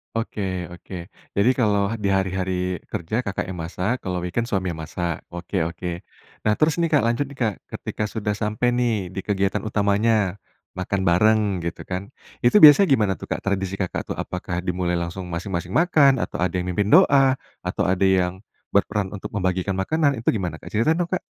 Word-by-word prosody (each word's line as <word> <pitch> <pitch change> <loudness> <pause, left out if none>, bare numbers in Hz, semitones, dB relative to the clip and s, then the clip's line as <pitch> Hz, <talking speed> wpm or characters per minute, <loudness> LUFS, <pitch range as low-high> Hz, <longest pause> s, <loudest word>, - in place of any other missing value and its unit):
Oke 115 -2 -3 0.3
oke. 90 +2 -12 0.4
Jadi, 100 +5 +4
kalau 100 -2 +2
di - - +2
hari-hari 90 -1 -1
kerja, 85 +5 -3
Kakak 100 - -2
yang 90 - -7
masak, 95 +9 -2
kalau 90 -2 -3
weekend 115 +7 -2
suami 95 -4 -1
yang 80 - -7
masak, 85 +1 -3
oke 90 +3 -5
oke. 90 +1 -6 0.6
Nah, 105 - +4
terus 155 +2 +2
nih 170 - +3
Kak 145 - +4
lanjut 120 +5 +1
nih 140 - -11
Kak, 105 -4 0
ketika 105 - -5
sudah 105 -1 -2
sampai 105 +3 0
nih 120 -2 +1 0.2
di 95 - -5
kegiatan 100 -1 +1
utamanya, 105 -1 +1 0.3
makan 95 +1 -2
bareng 105 +6 +4 0.2
gitu 85 - -4
kan, 95 +2 -5 0.4
itu 120 - +4
biasanya 155 +6 +10
gimana 105 -6 +2
tuh - - -8
Kak, - - -3
tradisi 95 -1 -1
Kakak 95 -2 -3
tuh? - - -3
Apakah 90 0 -4
dimulai 90 -1 -1
langsung 85 +2 -4
masing-masing 90 +1 -4
makan, 155 -5 +5
atau - - -5
ada 90 +1 0
yang 90 0 -1
mimpin 100 +3 0
doa, 135 -1 +5 0.2
atau - - -2
ada 95 +1 +2
yang 95 -1 +1 0.3
berperan 100 -1 +1
untuk 105 - -6
membagikan 95 0 0
makanan, 145 +9 +1
itu 115 - +2
gimana 95 -6 -2
Kak? - - -11
Cerita 115 +10 +2
dong, 175 +1 -2
Kak. 185 - +1
100 Hz, 185 wpm, -23 LUFS, 90-115 Hz, 0.6 s, biasanya